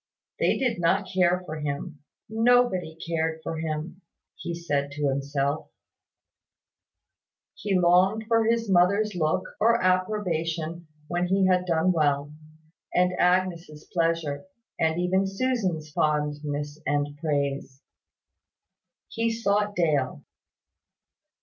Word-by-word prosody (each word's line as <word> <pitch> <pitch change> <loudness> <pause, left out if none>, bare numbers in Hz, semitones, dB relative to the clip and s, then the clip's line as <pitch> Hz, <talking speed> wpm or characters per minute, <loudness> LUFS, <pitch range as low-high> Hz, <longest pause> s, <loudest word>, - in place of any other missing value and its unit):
They - - +2
did 250 -8 0
not 170 -1 +2
care 180 -1 +2
for 155 -2 -6
him, 145 +1 -4 0.3
nobody 225 -7 +2
cared 160 -1 -1
for 160 +2 -4
him, 160 +3 -4 0.3
he 170 -1 -5
said 145 -4 -1
to 145 -1 0
himself; 140 +2 -2 1.8
he 200 -2 -1
longed 185 +5 +3
for 225 -1 +3
his 230 0 +1
mother's 200 +3 +3
look 155 -3 0 0.2
or 230 +2 +4
approbation 175 -4 -1 0.2
when 175 +2 -1
he 190 +1 +2
had 180 -1 +2
done 165 +1 +2
well, 145 -3 +1 0.6
and 180 0 +2
Agnes' 175 -4 +1
pleasure, 165 - 0 0.3
and 160 +1 +1
even 190 +2 +1
Susan's 195 -8 -1
fondness 150 0 -1
and 145 0 0
praise. 140 -3 -2 1.2
He 230 0 -1
sought 210 -2 0
Dale. 145 - 0
170 Hz, 110 wpm, -26 LUFS, 150-190 Hz, 1.8 s, or